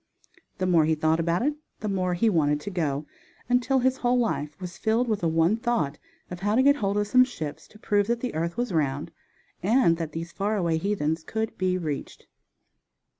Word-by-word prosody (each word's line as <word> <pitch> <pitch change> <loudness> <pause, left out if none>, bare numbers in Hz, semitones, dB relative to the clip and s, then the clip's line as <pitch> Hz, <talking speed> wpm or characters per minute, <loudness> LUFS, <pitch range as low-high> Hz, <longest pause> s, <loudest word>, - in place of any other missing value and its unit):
The 185 - -1
more 170 -4 +4
he 160 0 +2
thought 160 +1 +1
about 170 +4 +1
it 295 +3 +1 0.3
the 215 - -2
more 185 -3 0
he 225 +6 +2
wanted 150 -7 +2
to 200 - -6
go, 150 -5 -1 0.4
until 250 +2 +2
his 260 +1 +2
whole 245 0 +2
life 150 -11 -1
was 180 -2 -7
filled 225 +3 +1
with 215 -3 0
the 170 - 0
one 165 +6 +2
thought 230 - -1 0.3
of 180 - -6
how 205 +3 0
to 260 - +4
get 285 +1 +5
hold 200 -3 0
of 210 - +1
some 255 +5 +5
ships 155 - -6
to - - -17
prove 205 -1 +1
that 235 0 0
the 250 0 -3
earth 170 +2 -2
was 245 -5 -1
round, 150 +1 -1 0.5
and 200 -3 +3
that 160 -2 -4
these 165 +1 -5
far 205 +3 -1
away 170 -4 +1
heathens 160 -4 -1
could 220 +3 -3
be 185 -1 0
reached. 155 -5 -5
185 Hz, 210 wpm, -26 LUFS, 160-225 Hz, 0.5 s, get